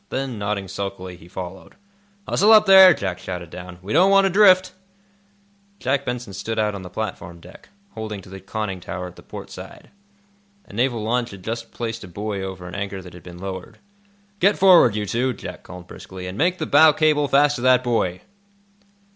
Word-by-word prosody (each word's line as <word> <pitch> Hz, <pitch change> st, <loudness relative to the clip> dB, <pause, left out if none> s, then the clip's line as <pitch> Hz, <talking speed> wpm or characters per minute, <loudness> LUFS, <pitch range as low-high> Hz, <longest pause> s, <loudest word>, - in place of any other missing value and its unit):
Then, 130 Hz, -4 st, -4 dB
nodding 100 Hz, -1 st, -3 dB
sulkily, 95 Hz, -1 st, -6 dB
he 85 Hz, -1 st, -16 dB
followed. 95 Hz, +1 st, -9 dB, 0.5 s
"Hustle 210 Hz, +3 st, +3 dB
up, 215 Hz, -1 st, +7 dB
there!" 190 Hz, -1 st, +9 dB
Jack 95 Hz, -, -2 dB
shouted 90 Hz, -2 st, -7 dB
down. 90 Hz, -1 st, -9 dB
"We 100 Hz, -, -4 dB
don't 180 Hz, +5 st, +5 dB
want 195 Hz, 0 st, +5 dB
to 195 Hz, -, +1 dB
drift." 185 Hz, -1 st, +5 dB, 1.0 s
Jack 140 Hz, -3 st, -1 dB
Benson 125 Hz, -4 st, -5 dB
stood 110 Hz, +4 st, -5 dB
out 105 Hz, -1 st, 0 dB
on 100 Hz, -, -6 dB
the 90 Hz, -, -9 dB
platform 90 Hz, -4 st, -6 dB
deck, 90 Hz, +2 st, -16 dB, 0.2 s
holding 110 Hz, -2 st, -6 dB
to -, -, -15 dB
the 95 Hz, 0 st, -9 dB
conning 95 Hz, -1 st, -5 dB
tower 90 Hz, +1 st, -6 dB
at 90 Hz, -, -10 dB
the -, -, -14 dB
port -, -, -10 dB
side. -, -, -11 dB, 0.7 s
A -, -, -16 dB
naval 120 Hz, 0 st, 0 dB
launch 120 Hz, +2 st, -1 dB
had 95 Hz, -4 st, -12 dB
just 115 Hz, +2 st, -5 dB
placed 115 Hz, -1 st, -5 dB
a -, -, -9 dB
buoy 100 Hz, +2 st, -5 dB
over 95 Hz, -2 st, -7 dB
an 90 Hz, -, -10 dB
anchor 100 Hz, -1 st, -4 dB
that 90 Hz, -, -12 dB
had 90 Hz, -, -12 dB
been 90 Hz, +1 st, -12 dB
lowered. 95 Hz, 0 st, -7 dB, 0.6 s
"Get 200 Hz, +3 st, +3 dB
forward, 185 Hz, -, +6 dB
you 105 Hz, -1 st, -2 dB
two," 125 Hz, +5 st, -1 dB
Jack -, -, -9 dB
called 90 Hz, 0 st, -11 dB
briskly, 90 Hz, 0 st, -10 dB
"and 90 Hz, +1 st, -6 dB
make 175 Hz, -, +1 dB
the 155 Hz, -, -3 dB
bow 155 Hz, +1 st, +6 dB
cable 150 Hz, -1 st, +2 dB
fast 145 Hz, +1 st, +3 dB
to -, -, -7 dB
that 130 Hz, 0 st, +4 dB
buoy." 105 Hz, -7 st, -1 dB
105 Hz, 200 wpm, -22 LUFS, 95-135 Hz, 1.0 s, there